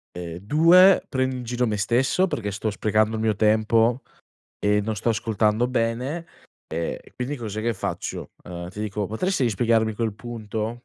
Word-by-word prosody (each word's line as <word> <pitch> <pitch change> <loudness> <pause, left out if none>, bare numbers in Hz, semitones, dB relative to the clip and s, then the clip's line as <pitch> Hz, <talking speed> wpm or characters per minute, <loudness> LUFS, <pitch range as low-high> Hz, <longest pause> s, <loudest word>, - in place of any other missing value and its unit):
Ehm, 85 -1 -6
2: 165 - +6
prendo 130 -1 -1
in 125 - -5
giro 120 +1 -1
me 105 -2 -1
stesso, 125 - +2
perché 105 - -3
sto 105 +2 -2
sprecando 110 +2 +1
il 110 - -3
mio 110 -2 +1
tempo 110 +3 +3 0.6
e 105 0 +2
non 110 +1 -3
sto 115 - 0
ascoltando 110 +1 +1
bene, 125 +7 -1 0.4
ehm, 80 +1 -3 0.2
quindi 130 +4 -3
cos'è 110 -4 -5
che 115 0 0
faccio? - - -4
Uhm, 85 0 -7
ti 105 - -8
dico: 105 -1 -2
"Potresti 130 - 0
spiegarmi 110 0 +1
quel 110 -2 -2
punto?" 115 +1 -5
110 Hz, 165 wpm, -24 LUFS, 105-125 Hz, 0.6 s, 2